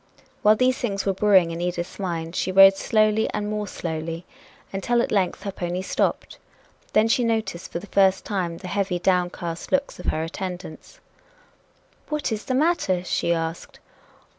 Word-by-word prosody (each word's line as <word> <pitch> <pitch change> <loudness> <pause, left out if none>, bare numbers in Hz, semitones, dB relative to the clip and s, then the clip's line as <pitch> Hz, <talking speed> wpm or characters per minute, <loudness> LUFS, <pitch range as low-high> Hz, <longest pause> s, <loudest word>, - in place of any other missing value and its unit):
While 215 +1 +6
these 255 +3 +2
things 200 -5 -2
were 195 - +2
brewing 190 -3 +4
in 165 +1 -5
Edith's 175 +1 -3
mind, 170 -3 -3
she 185 - -1
rode 195 +1 +8
slowly 215 +1 +2
and 210 0 -2
more 210 0 -3
slowly, 165 -1 -5 0.5
until 240 +5 +1
at - - 0
length 190 -4 0
her 200 - -3
pony 180 0 -3
stopped. - - -1 0.5
Then 215 +1 +4
she 240 +2 +2
noticed 220 -6 -2
for - - -3
the 175 - -7
first 190 -1 +2
time 180 -5 -2
the 185 - -8
heavy, 195 -1 -1
downcast 175 -2 -1
looks 280 0 0
of - - -8
her 155 - 0
attendants. 180 - -7 1.1
"What 300 -5 -2
is 215 -1 -3
the 255 - -1
matter?" 260 - +1
she 170 - 0
asked. 165 0 -3
190 Hz, 165 wpm, -24 LUFS, 175-215 Hz, 1.1 s, rode